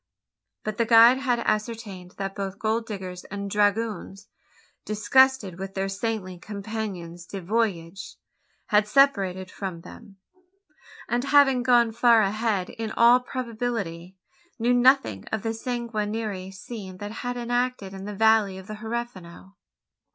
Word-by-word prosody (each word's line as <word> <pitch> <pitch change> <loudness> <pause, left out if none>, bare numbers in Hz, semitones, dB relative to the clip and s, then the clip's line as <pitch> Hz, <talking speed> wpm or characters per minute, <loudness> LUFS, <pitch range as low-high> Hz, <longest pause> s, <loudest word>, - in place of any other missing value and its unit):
But 215 -1 -4
the 230 - +3
guide 230 +3 +7
had 250 -3 +1
ascertained 215 -4 -3
that 195 0 -4
both 195 -1 -5
gold 225 +2 -1
diggers 185 -4 -6
and 200 0 -6
dragoons 205 0 -1 0.5
disgusted 215 -2 +2
with 195 0 -6
their 195 0 -1
saintly 195 -2 -4
compagnons 195 -4 -6
du 195 - -6
voyage 190 -3 -2 0.5
had 210 -1 +3
separated 195 -8 +2
from 185 -4 -6
them; 205 +2 -13 0.9
and, 245 +2 -1
having 275 -2 +5
gone 240 -2 +4
far 230 -1 +5
ahead, 205 -2 -1
in 225 -1 -5
all 240 +2 +6
probability 225 -8 -4 0.4
knew 240 +1 +2
nothing 245 - +3
of 220 -2 -2
the 225 0 -1
sanguinary 220 -5 -3
scene 195 -1 -9
that 205 +2 -6
had 245 +2 -4
been 240 - -4
enacted 245 -4 -1
in 195 0 -8
the 205 0 -6
valley 220 -2 +3
of 190 - -10
the 215 +1 -7
Huerfano! 210 -5 -6
215 Hz, 135 wpm, -25 LUFS, 195-235 Hz, 0.9 s, guide